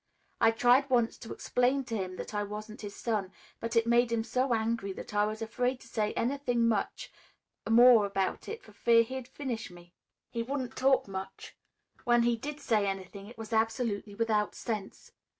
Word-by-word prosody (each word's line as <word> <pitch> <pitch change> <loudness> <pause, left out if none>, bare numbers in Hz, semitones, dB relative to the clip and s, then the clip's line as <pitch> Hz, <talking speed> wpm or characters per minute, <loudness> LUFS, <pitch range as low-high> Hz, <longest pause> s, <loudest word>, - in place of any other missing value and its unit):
I - - +6
tried 245 +4 +4
once 240 -3 +2
to 225 - -9
explain 255 +2 +1
to 230 -3 -4
him 185 -3 -3
that - - -7
I 205 - 0
wasn't 210 +1 -6
his 205 -1 -7
son, 210 -5 -2 0.3
but 230 +1 -4
it 230 0 +4
made 235 0 +3
him 230 -1 +1
so 250 +3 0
angry 225 -3 0
that 210 - -9
I 205 0 +3
was 215 +1 -4
afraid 250 +3 -1
to - - -14
say 215 -2 -1
anything 245 -2 0 1.0
more 235 -1 +7
about 195 -1 -2
it 455 +2 -6
for - - -15
fear 230 -1 +4
he'd 260 +1 -6
finish 255 -4 -5
me. 175 0 -15 0.4
He 230 - -2
wouldn't 260 +1 -3
talk 265 -2 +3
much. 190 0 -7 0.5
When 240 -1 +4
he 240 0 +3
did 290 +6 -6
say 215 -7 +1
anything 195 +1 -5
it 235 - -13
was 225 0 -7
absolutely 220 -2 0
without 215 -2 0
sense. 215 -4 -5
230 Hz, 185 wpm, -30 LUFS, 210-245 Hz, 1.0 s, more